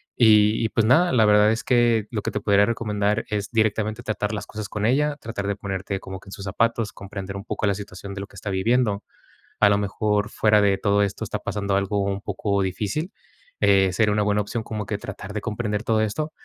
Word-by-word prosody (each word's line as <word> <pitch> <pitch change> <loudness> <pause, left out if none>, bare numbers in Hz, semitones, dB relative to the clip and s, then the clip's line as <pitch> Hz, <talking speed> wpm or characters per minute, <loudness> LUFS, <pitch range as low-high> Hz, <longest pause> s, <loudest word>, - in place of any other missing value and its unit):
Y 110 -1 +5
y 110 - +1
pues 110 0 +1
nada, 170 +9 +4
la 115 -4 +4
verdad 105 0 +5
es 110 - -2
que 120 -3 +3
lo 105 -3 -2
que - - -3
te 105 - -2
podría 100 0 +4
recomendar 105 -1 -1
es 105 -1 -2
directamente 110 -1 0
tratar 105 -1 -2
las 105 - -4
cosas 105 -1 -6
con 105 0 -2
ella, 145 +4 +2
tratar 105 -5 -5
de 100 - -1
ponerte 95 -1 -4
como 95 0 -8
que 95 - -20
en - - -11
sus 100 - -8
zapatos, 115 +2 0
comprender 100 0 -7
un 100 - -7
poco 110 - -2
la 100 - +2
situación 100 0 -8
de 100 - -6
lo 100 - -6
que - - -20
está 100 - -5
viviendo. 105 +2 +1 0.6
A 105 - +6
lo 100 - +3
mejor, 105 +1 0
fuera 105 -1 +3
de 100 -1 +3
todo 100 0 +2
esto, 100 - -3
está - - -3
pasando 100 -1 -2
algo 100 +1 0
un 100 0 -2
poco 100 0 -1
difícil. 105 - -3 0.5
Eh, 100 -2 +4
sería 105 +3 +2
una 105 0 +1
buena 105 0 +1
opción 110 +3 -4
como 105 -2 -5
que 105 0 -3
tratar 100 0 -8
de 105 - -3
comprender 105 -2 -2
todo 110 -1 +1
esto, 130 +9 -2
105 Hz, 230 wpm, -23 LUFS, 100-110 Hz, 0.6 s, A